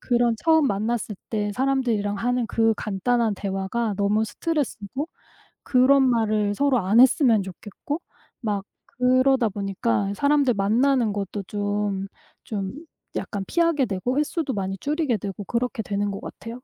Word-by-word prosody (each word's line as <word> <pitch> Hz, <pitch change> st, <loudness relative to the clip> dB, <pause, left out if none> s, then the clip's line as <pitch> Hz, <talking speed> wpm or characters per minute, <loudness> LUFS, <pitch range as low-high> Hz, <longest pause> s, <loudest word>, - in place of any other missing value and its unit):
그런 240 Hz, -2 st, +2 dB
처음 320 Hz, -3 st, +4 dB
만났을 210 Hz, 0 st, -2 dB
때 210 Hz, -2 st, -1 dB
사람들이랑 245 Hz, -7 st, 0 dB
하는 245 Hz, +2 st, 0 dB
그 225 Hz, 0 st, +2 dB
간단한 220 Hz, +2 st, 0 dB
대화가 200 Hz, +3 st, -2 dB
너무 210 Hz, +2 st, +2 dB
스트레스고 285 Hz, -, -3 dB, 0.6 s
그런 265 Hz, +2 st, +5 dB
말을 215 Hz, -3 st, +1 dB
서로 275 Hz, 0 st, +2 dB
안 205 Hz, +4 st, +4 dB
했으면 250 Hz, -5 st, +5 dB
좋겠고 205 Hz, -, -6 dB, 0.4 s
막 205 Hz, -3 st, -1 dB, 0.2 s
그러다 255 Hz, -1 st, +3 dB
보니까 200 Hz, +1 st, -1 dB
사람들 285 Hz, 0 st, +3 dB
만나는 230 Hz, +3 st, +2 dB
것도 200 Hz, 0 st, -4 dB
좀 205 Hz, -1 st, -2 dB, 0.4 s
좀 195 Hz, -3 st, -4 dB, 0.4 s
약간 200 Hz, -2 st, -3 dB
피하게 335 Hz, -5 st, +2 dB
되고 230 Hz, +7 st, -2 dB
횟수도 300 Hz, -2 st, -1 dB
많이 195 Hz, -1 st, -2 dB
줄이게 290 Hz, -, 0 dB
되고 200 Hz, +1 st, -6 dB
그렇게 240 Hz, +2 st, -2 dB
되는 205 Hz, 0 st, -1 dB
것 195 Hz, -, -5 dB
같아요. 230 Hz, -, -9 dB
225 Hz, 305 characters per minute, -24 LUFS, 200-260 Hz, 0.6 s, 그런